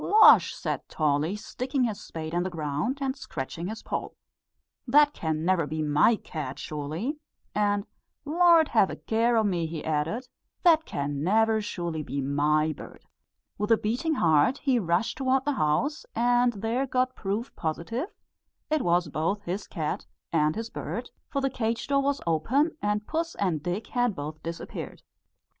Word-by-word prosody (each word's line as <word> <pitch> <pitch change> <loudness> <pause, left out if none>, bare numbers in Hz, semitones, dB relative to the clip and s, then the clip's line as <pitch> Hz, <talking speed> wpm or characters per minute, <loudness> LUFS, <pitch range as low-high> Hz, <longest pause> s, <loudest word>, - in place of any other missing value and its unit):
"Losh!" 435 +1 +7
said - - -4
Tolly, 155 +4 +1
sticking 255 +5 -2
his 220 -4 -1
spade 160 0 -6
in 175 - +1
the 185 - -1
ground 155 - -2
and 270 -1 -1
scratching 165 - -5
his 220 +2 -6
poll, - - -4 0.7
"that 295 +3 +5
can 160 -1 -2
never 175 -4 +2
be 155 +1 -2
my 150 +10 +4
cat 150 -9 -6
sure_ly_!" 155 - -4 0.4
and 205 -1 +1 0.4
"Lord, 330 0 +5
have 215 -5 +4
a - - -4
care 230 +1 +1
o' 220 - +4
me!" 175 -5 0
he 160 -1 -6
added; 160 - -1 0.4
"that 325 -3 +5
can 140 0 -3
never 220 +4 +3
surely 170 -6 -3
be 140 -1 -4
my 150 +3 +2
bird." - - -12 0.5
With 210 +2 0
a 225 - +7
beating 255 +11 -1
heart 160 - +3
he 265 -5 +2
rushed 180 - 0
towards 265 0 +2
the 290 - +2
house, 265 - 0
and 245 +1 +3
there 225 +6 -1
got 255 0 +1
proof 210 +5 -3
positive 225 - -3 0.6
it 310 -2 +2
was 175 -2 +2
both 165 +8 -1
his 190 +3 -4
cat 155 -2 -3 0.3
and 155 0 +2
his 225 +1 -5
bird; 240 +1 -5 0.2
for 275 - -1
the 270 - +1
cage 230 -2 -1
door 275 0 +2
was 280 0 0
open, 250 - +2
and 210 0 0
puss 330 +1 -2
and 175 -7 0
Dick 180 +7 -3
had 245 -4 +1
both 150 +2 -6
disappeared. 165 0 -6
205 Hz, 165 wpm, -27 LUFS, 160-255 Hz, 0.7 s, Losh